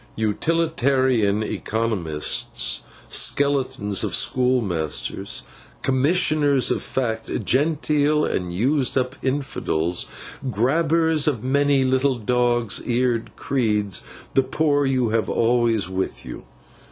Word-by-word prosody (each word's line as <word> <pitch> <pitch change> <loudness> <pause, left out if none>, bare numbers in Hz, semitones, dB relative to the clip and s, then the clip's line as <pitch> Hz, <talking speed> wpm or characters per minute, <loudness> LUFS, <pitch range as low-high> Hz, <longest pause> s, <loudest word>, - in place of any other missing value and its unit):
Utilitarian 130 -3 +1
economists, 95 - -2 0.3
skeletons 135 -8 +1
of - - 0
schoolmasters, 115 - -1 0.4
Commissioners 145 0 +3
of - - 0
Fact, 110 -4 -3
genteel 150 +2 +2
and 90 -1 -2
used 130 +8 +1
up 130 0 -1
infidels, 90 - -2 0.4
gabblers 155 - +2
of 125 -8 0
many 140 +1 +2
little 130 +1 +2
dog's 120 -1 +1
eared 120 -1 -1
creeds, 105 -7 -1 0.3
the 135 - +4
poor 145 0 +1
you 130 -1 +1
will 115 - 0
have 115 -1 0
always 115 -4 +2
with 95 0 -4
you. 65 - -8
125 Hz, 100 wpm, -22 LUFS, 110-140 Hz, 0.4 s, the